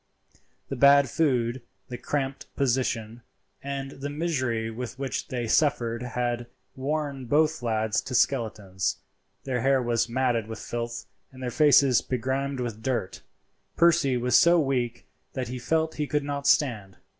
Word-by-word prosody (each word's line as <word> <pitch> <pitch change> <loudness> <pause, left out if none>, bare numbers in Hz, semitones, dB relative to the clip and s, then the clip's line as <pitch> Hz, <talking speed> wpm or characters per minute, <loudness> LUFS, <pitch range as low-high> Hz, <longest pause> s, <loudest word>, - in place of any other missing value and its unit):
The - - -3
bad 140 0 +5
food, 125 -5 +1 0.3
the 125 - -5
cramped 135 -1 -3
position, 120 -3 -1 0.4
and 135 -1 -4
the 140 +1 -6
misery 130 -8 -1
which 125 +3 -4
they 120 -2 -3
suffered 120 -3 +1
had 120 -1 -2 0.3
worn 140 -1 -3
both 155 +3 +2
lads 110 -2 0
to 125 - -3
skeletons. 110 -8 0 0.5
Their 125 -3 -2
hair 135 +1 +3
was 120 -1 0
matted 120 -3 0
with 110 0 -6
filth; 120 +2 -5 0.3
their 130 -2 -5
faces 140 -3 +5
begrimed 130 +2 -2
with 115 -3 -4
dirt. 120 -6 -2 0.6
Percy 170 -6 +4
was 125 0 +1
so 170 0 +6
weak 130 -5 -1 0.3
that 130 -3 -4
he 125 0 -5
felt 160 +5 0
he 150 - -1
could 150 0 0
not 140 0 -3
stand. 110 -12 +1
130 Hz, 140 wpm, -26 LUFS, 120-140 Hz, 0.6 s, so